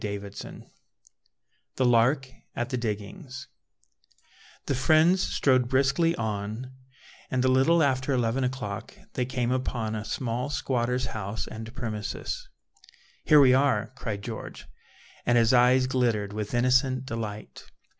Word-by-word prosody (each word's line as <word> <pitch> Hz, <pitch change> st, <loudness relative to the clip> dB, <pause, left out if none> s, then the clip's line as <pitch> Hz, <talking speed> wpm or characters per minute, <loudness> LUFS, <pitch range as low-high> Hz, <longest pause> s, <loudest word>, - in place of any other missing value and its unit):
Proverbs 100 Hz, -1 st, -5 dB, 1.3 s
THE 130 Hz, -, +1 dB
LARK 125 Hz, +3 st, +3 dB, 0.3 s
AT 120 Hz, 0 st, -2 dB
THE 130 Hz, -, 0 dB
DIGGINGS 125 Hz, -, -5 dB, 1.2 s
The -, -, 0 dB
friends 155 Hz, +7 st, +4 dB
strode 130 Hz, -3 st, +2 dB
briskly 140 Hz, +6 st, +2 dB
on, 110 Hz, +3 st, -4 dB, 0.6 s
and 130 Hz, 0 st, 0 dB
a -, -, +4 dB
little 135 Hz, +6 st, +4 dB
after 130 Hz, 0 st, +1 dB
eleven 125 Hz, 0 st, +1 dB
o'clock 125 Hz, -6 st, -4 dB, 0.2 s
they 125 Hz, -, -1 dB
came 125 Hz, -2 st, -1 dB
upon 120 Hz, -4 st, -2 dB
a 110 Hz, -1 st, -3 dB
small 125 Hz, +3 st, -3 dB
squatter's 125 Hz, -3 st, -1 dB
house 110 Hz, -1 st, -4 dB
and 110 Hz, +1 st, -8 dB
premises. 110 Hz, -5 st, -4 dB, 0.8 s
"Here 150 Hz, -, +7 dB
we 130 Hz, -3 st, +7 dB
are," 130 Hz, -4 st, +2 dB
cried 105 Hz, -6 st, -5 dB
George, -, -, -7 dB, 0.6 s
and 120 Hz, 0 st, +3 dB
his 115 Hz, +1 st, +4 dB
eyes 125 Hz, +1 st, +5 dB
glittered 115 Hz, -6 st, 0 dB
with 105 Hz, +2 st, -4 dB
innocent 130 Hz, +1 st, +2 dB
delight. 110 Hz, -3 st, -6 dB
125 Hz, 125 wpm, -27 LUFS, 110-130 Hz, 1.3 s, Here